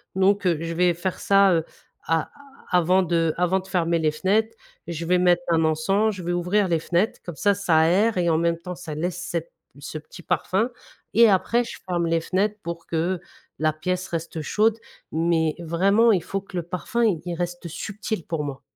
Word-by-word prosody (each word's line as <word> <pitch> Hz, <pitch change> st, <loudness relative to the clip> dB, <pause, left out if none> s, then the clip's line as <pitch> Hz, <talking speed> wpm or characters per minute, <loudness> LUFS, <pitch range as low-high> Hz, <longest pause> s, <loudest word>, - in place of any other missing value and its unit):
Donc, 195 Hz, +1 st, +2 dB
heu, 175 Hz, -3 st, +3 dB
je 165 Hz, 0 st, -4 dB
vais 175 Hz, 0 st, +3 dB
faire 180 Hz, +2 st, -4 dB
ça, 195 Hz, -1 st, +5 dB
heu, 165 Hz, -, +2 dB, 0.4 s
a 165 Hz, -1 st, +1 dB, 0.4 s
avant 180 Hz, +1 st, +3 dB
de 165 Hz, -2 st, +1 dB
avant 180 Hz, +2 st, +2 dB
de 190 Hz, -, -16 dB
fermer 170 Hz, -3 st, +1 dB
les 155 Hz, -1 st, +1 dB
fenêtres 215 Hz, +8 st, +1 dB, 0.3 s
et -, -, -4 dB
je 165 Hz, 0 st, -4 dB
vais 180 Hz, +1 st, +3 dB
mettre 175 Hz, -1 st, +4 dB
un 165 Hz, -1 st, +3 dB
encens, 195 Hz, +8 st, +1 dB
je 185 Hz, -, -7 dB
vais 175 Hz, -, -1 dB
ouvrir 180 Hz, +3 st, +1 dB
les 165 Hz, -2 st, +1 dB
fenêtres 175 Hz, +6 st, 0 dB
comme 175 Hz, -3 st, -7 dB
ça, 205 Hz, -1 st, +3 dB
ça 190 Hz, -5 st, +1 dB
aère 190 Hz, +6 st, +3 dB
et 170 Hz, -1 st, +2 dB
en 160 Hz, -, +3 dB
même 170 Hz, 0 st, +1 dB
temps 180 Hz, +2 st, -7 dB
ça 160 Hz, -3 st, -7 dB
laisse 175 Hz, +3 st, -3 dB
cette 170 Hz, -2 st, -4 dB, 0.3 s
ce 155 Hz, -, -6 dB
petit 160 Hz, +3 st, -12 dB
parfum 195 Hz, +6 st, 0 dB, 0.4 s
et 230 Hz, +1 st, +7 dB
après 230 Hz, +5 st, +2 dB
je 235 Hz, -, -8 dB
ferme 175 Hz, -2 st, 0 dB
les 165 Hz, 0 st, +2 dB
fenêtres 195 Hz, +5 st, 0 dB
pour 170 Hz, 0 st, -6 dB
que 170 Hz, +2 st, -1 dB, 0.4 s
la 155 Hz, 0 st, +2 dB
pièce 180 Hz, +4 st, -3 dB
reste 165 Hz, -1 st, -4 dB
chaude. 215 Hz, +7 st, +2 dB, 0.4 s
Mais 160 Hz, -1 st, +1 dB
vraiment 195 Hz, +8 st, +3 dB
il 185 Hz, -, +2 dB
faut 195 Hz, -, -3 dB
que 195 Hz, -2 st, -8 dB
le 175 Hz, -, -1 dB
parfum 185 Hz, +8 st, -2 dB
il 190 Hz, -9 st, +2 dB
il 175 Hz, -1 st, -3 dB
reste 175 Hz, 0 st, -4 dB
subtil 205 Hz, +2 st, -5 dB
pour 165 Hz, -3 st, -2 dB
moi. 140 Hz, -2 st, -6 dB
175 Hz, 210 wpm, -24 LUFS, 165-195 Hz, 0.4 s, et